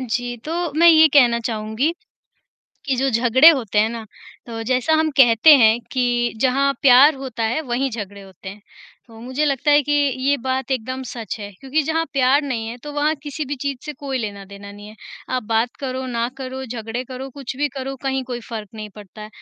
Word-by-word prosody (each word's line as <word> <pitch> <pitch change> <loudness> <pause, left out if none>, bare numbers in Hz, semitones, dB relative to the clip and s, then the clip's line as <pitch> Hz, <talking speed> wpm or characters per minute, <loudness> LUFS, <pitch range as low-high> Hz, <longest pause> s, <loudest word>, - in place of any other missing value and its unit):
जी, 245 0 -3
तो 335 -1 -3
मैं 340 +2 +5
ये 320 -1 +7
कहना 245 -5 +4
चाहूँगी 220 +6 -2 0.9
कि 270 -2 0
जो 270 +2 0
झगड़े 245 +5 +6
होते 225 - +1
हैं 220 +1 +2
ना, 230 -1 -7 0.4
तो 225 -1 -6
जैसा 255 +5 0
हम 315 0 +1
कहते 240 +4 +7
हैं 225 -1 +4
कि 245 -2 0
जहाँ 275 +2 +2
प्यार 275 +3 +7
होता 260 -4 -5
है 230 +7 0
वहीं 265 0 -2
झगड़े 200 -2 -7
होते 190 -1 -11
हैं। 200 +2 -12 0.5
तो 225 -1 -15
मुझे 260 +5 -2
लगता 280 0 +1
है 290 0 +5
कि 290 - -3 0.3
ये 280 +2 +1
बात 260 +1 -3
एकदम 255 +1 -3
सच 230 -3 -6
है, 205 -1 -7
क्योंकि 275 +4 -1
जहाँ 320 +2 -1
प्यार 275 +2 +3
नहीं 240 -6 -4
है 235 +2 -7
तो 295 - -7
वहाँ 295 +1 +1
किसी 295 +1 -5
भी 285 +2 -4
चीज़ 280 -2 -3
से 300 - -5
कोई 275 -2 -3
लेना-देना 200 -2 -8
नहीं 205 +1 -12
है। 215 - -13 0.4
आप 250 - -2
बात 225 +2 0
करो, 260 -1 -4
ना 235 -1 -2
करो, 265 0 -6
झगड़े 230 0 -5
करो, 260 +1 -8
कुछ 270 -1 -8
भी 295 +1 +1
करो, 270 0 -5
कहीं 265 -1 -1
कोई 245 -1 -6
फ़र्क 215 -3 -6
नहीं 215 -1 -7
पड़ता 210 0 -12
है। 210 - -8
255 Hz, 205 wpm, -20 LUFS, 225-275 Hz, 0.9 s, ये